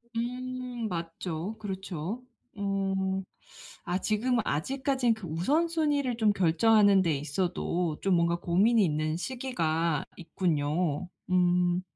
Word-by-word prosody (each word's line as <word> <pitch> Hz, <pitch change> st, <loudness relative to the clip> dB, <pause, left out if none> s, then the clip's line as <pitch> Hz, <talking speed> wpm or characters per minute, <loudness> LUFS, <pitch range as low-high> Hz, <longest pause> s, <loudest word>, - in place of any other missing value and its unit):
음 250 Hz, 0 st, -3 dB
맞죠. 170 Hz, +2 st, -4 dB
그렇죠. 195 Hz, +1 st, -5 dB, 0.3 s
어 195 Hz, -1 st, -1 dB, 0.6 s
아 175 Hz, +1 st, 0 dB
지금 230 Hz, +5 st, +1 dB
아직까진 260 Hz, -, 0 dB
그 220 Hz, -3 st, -8 dB
우선순위를 290 Hz, -, +1 dB
좀 215 Hz, -3 st, +3 dB
결정하는 200 Hz, +3 st, +4 dB
데 165 Hz, -5 st, +1 dB
있어도 170 Hz, +2 st, -1 dB
좀 195 Hz, -2 st, +2 dB
뭔가 170 Hz, 0 st, +2 dB
고민이 205 Hz, +7 st, +3 dB
있는 155 Hz, -2 st, 0 dB
시기가 170 Hz, -, -1 dB
있군요. 165 Hz, -1 st, -1 dB, 0.2 s
음. 180 Hz, 0 st, +3 dB
190 Hz, 220 characters per minute, -29 LUFS, 170-230 Hz, 0.6 s, 결정하는